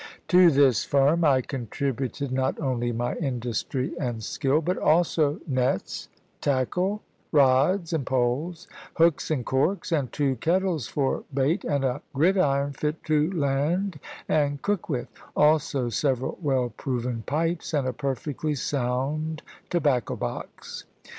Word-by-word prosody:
To 180 -1 +7
this 135 -6 +4
firm 145 +5 +3
I 135 -4 +4
contributed 135 +2 -3
not 130 0 0
only 125 -4 -1
my 120 +1 -1
industry 125 -2 -2
and 120 -5 -3
skill, 135 +7 +1
but 175 +3 -1
also 155 -1 +2
nets, 130 - -1 0.3
tackle, 180 - 0 0.3
rods 150 +6 +3
and 160 -4 0
poles, 135 +8 -1 0.3
hooks 165 -2 +3
and 140 -7 -1
corks, 155 +10 0
and 145 -6 0
two 140 -3 0
kettles 170 -1 0
for 135 -2 -1
bait, 140 +7 +1
and 140 -3 0
a 125 -1 -1
gridiron 140 -3 +2
fit 150 +3 -3
to 155 +2 +2
land 155 +3 0 0.3
and 145 -2 +1
cook 205 -4 -1
with; 125 -5 -2 0.3
also 150 -4 +3
several 130 +1 -1
well 130 -5 +1
proven 125 -3 -3
pipes, 165 +4 -1
and 145 -4 0
a 130 - -1
perfectly 145 +2 -2
sound 140 +4 -2 0.3
tobacco 145 -8 +1
box. - - -6
140 Hz, 130 wpm, -26 LUFS, 130-160 Hz, 0.3 s, To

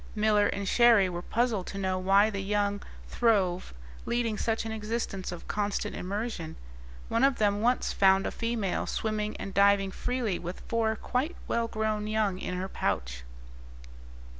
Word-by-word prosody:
Miller 210 -1 +3
and 200 - -3
Cherrie 230 -4 +5
were 175 -1 -4
puzzled 220 -1 0
to 195 - -6
know 190 -1 -1
why 195 +3 +4
the 200 -1 -3
young 205 0 0 0.3
throve, 195 -6 +1 0.4
leading 235 -2 0
such 225 +1 -1
an 225 - -3
existence 215 -3 -3
of 175 - -8
constant 205 -1 -2
immersion; 200 -3 -4 0.5
one 230 - +1
of 275 -1 +4
them 205 -1 +1
once 245 +3 +1
found 195 0 +4
a - - -1
female 230 -5 -2
swimming 215 -1 -2
and 195 - -6
diving 200 -1 +4
freely 240 -4 -2
with 175 +1 -6
four 225 -1 0
quite 265 +9 -2
well 230 0 0
grown 215 -1 -2
young 215 -3 0
in 180 - -4
her 185 +1 -3
pouch. 60 - -2
210 Hz, 160 wpm, -29 LUFS, 190-225 Hz, 0.5 s, Cherrie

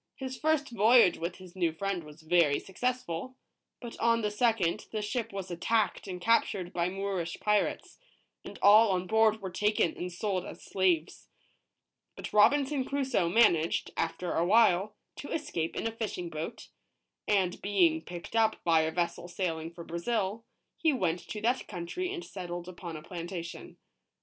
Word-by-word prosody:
H 265 - -4
is - - -5
first 310 -2 +1
voyage 225 -3 +5
with 170 +2 -3
his 185 -1 -14
new 175 -3 +1
friend 185 +1 -3
was 150 +1 -14
very 160 -3 +3
successful; 250 0 -3 0.4
but 235 -1 -9
on 230 0 +2
the 210 - 0
second, 210 -6 +1
the 220 - -2
ship 225 +2 -3
was 195 -2 -6
attacked 210 +6 0
and 180 -2 -5
captured 195 -3 +1
by 170 0 0
Moorish 190 -3 -3
pirates, 210 -1 0 0.4
and - - -9
all 215 +2 +8
on 180 0 -1
board 220 +1 +3
were 190 - -4
taken 210 -3 +1
and 180 +1 -5
sold 185 0 -2
as - - -10
slaves. 180 -4 0 0.9
But - - -8
Robinson 275 +6 +4
Crusoe 265 -10 0
managed, 170 -6 +3
after 170 +2 -2
a 165 - +1
while, 205 0 +4 0.2
to 285 - -7
es 305 -2 -3
cape 165 -1 -2
in - - -3
a 225 - 0
fishing 210 -6 -4
boat; 165 +9 -6 0.6
and 190 -4 +1
being 175 -5 +3
picked 175 +5 -9
up 220 -1 +3
by 165 -2 +4
a 160 0 0
vessel 175 +1 -2
sail 175 -2 -2
ing 160 +1 -6
for 170 0 -10
Brazil, 195 +5 -2 0.3
he 320 - +3
went 180 - 0
to 210 - -5
that 240 +4 0
country 210 - -4
and 360 -3 -5
settled 175 -2 -6
upon 175 -3 -7
a 155 - -10
plantation. 170 0 -7
190 Hz, 170 wpm, -30 LUFS, 170-225 Hz, 0.9 s, all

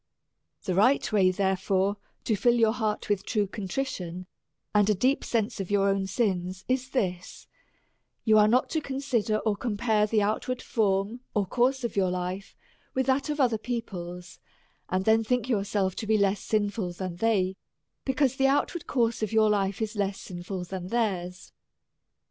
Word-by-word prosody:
The 185 - -1
right 220 +9 +3
way 195 -3 +4
therefore 190 +1 +1 0.3
to 220 - +1
fill 240 +4 +3
your 225 -2 +4
heart 220 -3 -2
with 205 -2 0
true 210 0 0
contrition, 190 -3 -4 0.5
and 205 0 +4
a 210 - +4
deep 255 +8 +1
sense 230 -1 -1
of 195 - -4
your 200 -1 +3
own 195 -1 0
sins, 190 -3 -1
is 255 0 0
this: 185 -9 -3 0.8
You 215 -1 +6
are 210 - +6
not 245 +4 +3
to 315 - 0
consider, 265 -6 -1
or 215 -1 0
compare 210 -1 +1
the 215 -1 +2
out 215 +2 -1
ward 255 -1 -2
form 205 +1 0 0.2
or 205 -2 +2
course 255 +6 +1
of 235 - -3
your 190 -2 +2
life 180 +2 -4 0.4
with 260 0 +1
that 270 +2 +1
of 300 0 -2
other 240 -5 +2
peo 240 +1 -2
ple's, 180 -2 -8 0.5
and 185 +1 0
then 220 +1 +4
think 245 +1 0
yourself 200 -4 0
to 220 - -4
be 220 0 +3
less 200 0 +2
sinful 205 -3 -1
than 180 -1 -5
they, 190 -3 +1 0.5
because 265 -1 +1
the 270 - +4
outward 290 +4 0
course 235 -3 +1
of 215 - -1
your 220 -1 +4
life 200 +1 0
is 220 +1 -4
less 200 -1 -1
sinful 180 +1 -6
than 180 0 -6
theirs. 185 -5 -2
210 Hz, 175 wpm, -27 LUFS, 190-235 Hz, 0.8 s, You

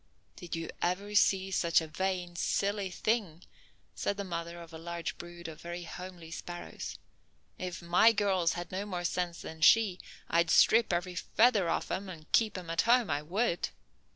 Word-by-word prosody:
"Did 175 -2 -6
you 165 0 -4
ever 195 +4 -1
see 195 -2 +3
such 170 -3 +3
a 160 - -4
vain, 180 +2 -2
silly 200 +3 0
thing?" 185 -4 -1 0.5
said 200 - -2
the 200 - -2
mother 170 -2 -5
of 165 -1 -11
a 160 - -7
large 170 0 -4
brood 175 -1 -8
of 160 -1 -9
very 175 +1 -6
homely 175 -1 -9
sparrows. 175 +1 -7 0.6
"If 180 -1 -5
my 175 +7 +6
girls 195 -6 +2
had 175 0 -6
no 195 +2 -3
more 180 -3 -3
sense 175 -1 -2
than 160 0 -8
she, 195 +1 +5 0.3
I'd 170 -1 +2
strip 225 +6 +5
every 175 +1 -1
feather 205 +1 +3
off - - -1
'em 195 0 -3
and 160 -4 -11
keep 215 -4 +3
'em 175 -2 -6
at 165 - +2
home, 235 -6 +3
I 145 0 0
would!" 175 +3 0
180 Hz, 180 wpm, -31 LUFS, 170-195 Hz, 0.6 s, my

